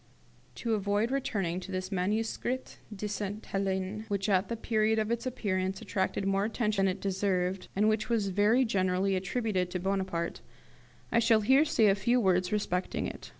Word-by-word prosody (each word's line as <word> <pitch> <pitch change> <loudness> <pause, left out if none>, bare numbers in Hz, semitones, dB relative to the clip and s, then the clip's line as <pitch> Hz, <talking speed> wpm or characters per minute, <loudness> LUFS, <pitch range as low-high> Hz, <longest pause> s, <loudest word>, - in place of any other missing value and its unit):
To 230 - -2
avoid 205 +3 0
returning 195 -10 -1
to 185 +1 -8
this 185 +1 -3
'Manuscrit 220 +6 -2
de 210 0 -4
Sainte 205 +1 -4
Helene', 195 +2 -2
which 200 -1 -1
at 190 0 +3
the 230 - -2
period 220 0 +1
of 215 +1 0
its 235 +2 -1
appearance 190 -6 -1
attracted 190 -1 -2
more 195 0 +1
attention 215 -2 0
than 185 - 0
it - - -13
deserved, 190 -1 -1
and 210 +2 +3
which 215 +1 +1
was 220 -4 +1
very 210 +7 +3
generally 190 -2 +1
attributed 190 -1 -1
to 180 - -3
Bonaparte, 190 -3 -2 0.7
I 235 - +4
shall 225 -1 +4
here 265 +8 +5
say 225 -7 +3
a 200 - +6
few 235 +6 +2
words 185 -4 +2
respecting 190 -3 -1
it. - - -7
200 Hz, 175 wpm, -30 LUFS, 190-220 Hz, 0.7 s, a